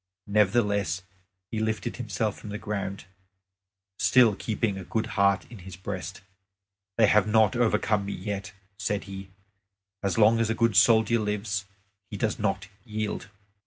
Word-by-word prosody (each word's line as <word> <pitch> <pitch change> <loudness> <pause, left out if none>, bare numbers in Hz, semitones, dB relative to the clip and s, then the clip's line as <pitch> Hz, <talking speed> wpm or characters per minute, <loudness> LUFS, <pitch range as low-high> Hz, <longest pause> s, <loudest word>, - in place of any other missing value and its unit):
Nevertheless 100 -4 +1 0.5
he 110 - -2
lifted 110 -2 -2
himself 110 -2 -2
from 105 - -10
the 105 - -4
ground, 100 -3 -4 0.9
still 105 +2 +5
keeping 110 -1 -1
a 95 - -6
good 110 +5 -1
heart 100 -3 +3
in 115 - -10
his 95 0 -9
breast. 95 0 -6 0.8
"They 115 - +6
have 105 0 +4
not 110 -2 +4
overcome 105 -3 +1
me 100 - -3
yet," 100 0 -5 0.3
said 100 +1 -1
he; 95 -1 -8 0.7
"as 100 +1 -1
long 110 +1 +5
as 115 -1 +1
a 115 - +1
good 115 -3 +2
soldier 110 +3 +5
lives, 105 -1 -2 0.4
he - - -6
does - - -1
not - - -1 0.2
yield." 110 -2 -4
105 Hz, 150 wpm, -27 LUFS, 100-110 Hz, 0.9 s, They